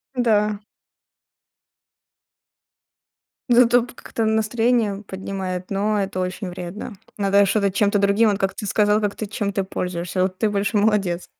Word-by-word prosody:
Да. 210 -4 +2 2.9
Зато 240 0 +5
пк - - -14
как-то 225 - -3
настроение 220 -1 +1
поднимает, 190 -2 -5
но 205 +1 0
это 190 -1 -3
очень 185 +1 -4
вредно. 180 +5 -7 0.2
Надо 200 0 +3
что-то 200 0 +1
чем-то 205 +1 +2
другим, 200 +3 +3
вот 200 -1 -1
как 195 -1 0
ты - - -6
сказал, 210 +1 +2
как 205 -1 -1
ты 215 - -4
чем-то 200 -2 -2
пользуешься. 180 -1 -3
Вот 185 0 -1
ты 220 - +1
большой 205 +1 0
молодец. 200 -5 +1
200 Hz, 135 wpm, -22 LUFS, 190-215 Hz, 2.9 s, Зато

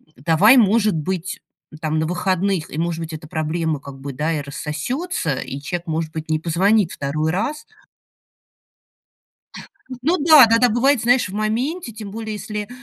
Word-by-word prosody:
давай, 170 - +5
может 215 -3 +3
быть, 175 +2 -3 0.4
там, 155 0 -1
на 160 - 0
выходных, 185 0 -1
и, 150 - -3
может 165 0 -2
быть, 160 0 -6
эта 155 0 -8
проблема, 160 -1 -2
как 135 -1 -11
бы, 140 +1 -6
да, 150 +5 -1
и 150 - -2
рассосется, 155 - -3
и 135 +2 -6
человек, 175 +4 -4
может 160 0 -2
быть, 160 0 -7
не 155 0 +1
позвонит 185 +4 +2
2 150 +3 -2
раз. 230 - -2 2.4
Ну 325 +8 +2
да, 305 -4 +8
да-да, 230 +2 +4
бывает, 245 +3 +2
знаешь, 245 +1 +3
в 185 - -10
моменте, 230 - -2
тем 215 -2 -8
более 220 0 -5
если 210 0 -5
180 Hz, 160 wpm, -20 LUFS, 155-225 Hz, 2.4 s, да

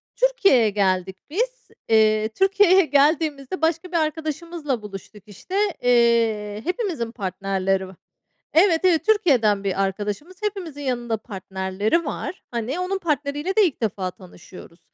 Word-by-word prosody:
Türkiye'ye 400 - +3
geldik 190 -2 0
biz. - - -3 0.2
Eee, 215 -1 +4
Türkiye'ye 385 - +4
geldiğimizde 295 +1 +1
başka 330 +2 0
bir 345 - +1
arkadaşımızla 310 -3 -3
buluştuk, 205 0 -10
işte. 215 - -8 0.3
Eee, 230 -4 +2
hepimizin 355 - -2
partnerleri 195 -2 -2
va 190 - -13 0.6
Evet, 330 0 +4
evet 330 -3 +3
Türkiye'den 255 - +3
bir 195 0 0
arkadaşımız. 210 - -4
Hepimizin 360 -9 -4
yanında 240 -4 -2
partnerleri 195 - -2
var. 365 +5 -5
Hani 240 +7 -3
onun 365 +2 -1
partneriyle 300 +2 -2
de 430 - +5
ilk 305 -8 -3
defa 190 -4 -2
tanışıyoruz. 180 -1 -14
260 Hz, 125 wpm, -23 LUFS, 205-340 Hz, 0.6 s, de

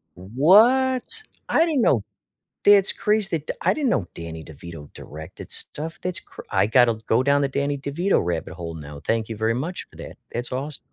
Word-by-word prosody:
What! 225 - +4 0.3
I 330 - +4
didn't 300 -7 +1
know 115 - +3 0.6
that's 200 -1 +6
crazy, 210 -6 0
d 150 - -5
I - - +3
didn't 285 -5 0
know 90 - 0
Danny 80 -1 -7
DeVito 80 0 -11
directed 80 +1 -10
stuff, 160 +2 -4
that's 180 -1 -2
cr - - -12
I - - +3
gotta 120 0 +4
go 115 +3 +3
down 140 +1 +3
the 140 - +2
Danny 140 +1 -1
DeVito 160 - 0
rabbit 85 -1 -3
hole 85 -1 -6
now, 75 -2 -9
thank 115 -1 0
you 110 - -5
very 110 +1 +1
much 165 +9 -4
for - - -20
that, - - -9
that's 120 +1 -4
awes 135 +3 -2
135 Hz, 185 wpm, -23 LUFS, -, 0.6 s, that's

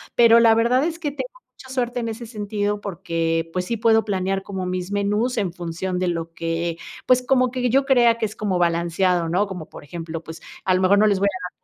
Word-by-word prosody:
Pero 235 -1 +7
la 225 -1 +6
verdad 240 +4 +3
es 335 0 -2
que 300 -4 -2
tengo 400 - -5 0.3
mucha 260 0 -11
suerte 245 -1 -1
en 230 -1 -3
ese 225 +2 -6
sentido, 205 -2 -3
porque, 165 -4 -2
pues, 180 0 -1
sí, 230 +4 -2
puedo 225 0 +3
planear 195 -1 -1
como 190 -2 -5
mis 180 +1 -3
menús 210 +5 0
en 195 -6 -1
función 180 +1 -4
de 185 - 0
lo 165 -1 -3
que, 165 0 -2 0.3
pues, 255 0 +4
como 255 -1 +2
que 250 -1 -1
yo 270 +3 +3
crea 240 -4 +4
que 230 - -1
es 215 - -6
como 200 -4 -1
balanceado, 170 0 +1
¿no? 185 +5 +2
Como, 180 -5 -7
por - - -11
ejemplo, 165 +1 -7
pues, 160 0 -10 0.2
a 185 - +3
lo 185 - +2
mejor, 195 +2 +4
no 215 - +5
les 200 -2 +2
voy 200 - +2
a 190 -2 -2
dar 180 - -5
200 Hz, 235 wpm, -22 LUFS, 175-230 Hz, 0.3 s, Pero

